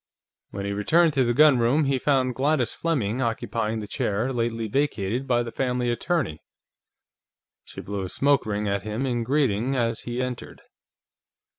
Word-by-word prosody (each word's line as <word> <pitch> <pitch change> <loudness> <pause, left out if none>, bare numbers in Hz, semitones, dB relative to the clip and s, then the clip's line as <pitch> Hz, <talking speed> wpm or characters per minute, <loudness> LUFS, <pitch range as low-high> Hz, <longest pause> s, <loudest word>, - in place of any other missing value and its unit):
When 100 0 -5
he 100 - -2
returned 155 - +3
to 135 -2 +3
the 120 - +1
gunroom, 145 -1 +5
he 135 -2 +1
found 130 -2 +1
Gladys 135 0 +1
Fleming 130 -8 -1
occupying 115 -2 -2
the 105 - -7
chair 110 +6 -1
lately 115 -2 -1
vacated 125 -1 -1
by 120 -1 +2
the 115 - -6
family 125 -2 -1
attorney. 120 - -1 1.2
She - - -9
blew 100 0 -4
a 95 - -4
smoke 140 +4 +2
ring 105 0 -2
at 100 0 0
him 110 +6 -3
in 120 -3 -1
greeting 130 -2 +1
as 115 -2 0
he 120 +1 -5
entered. 125 -1 -5
120 Hz, 160 wpm, -25 LUFS, 110-135 Hz, 1.2 s, gunroom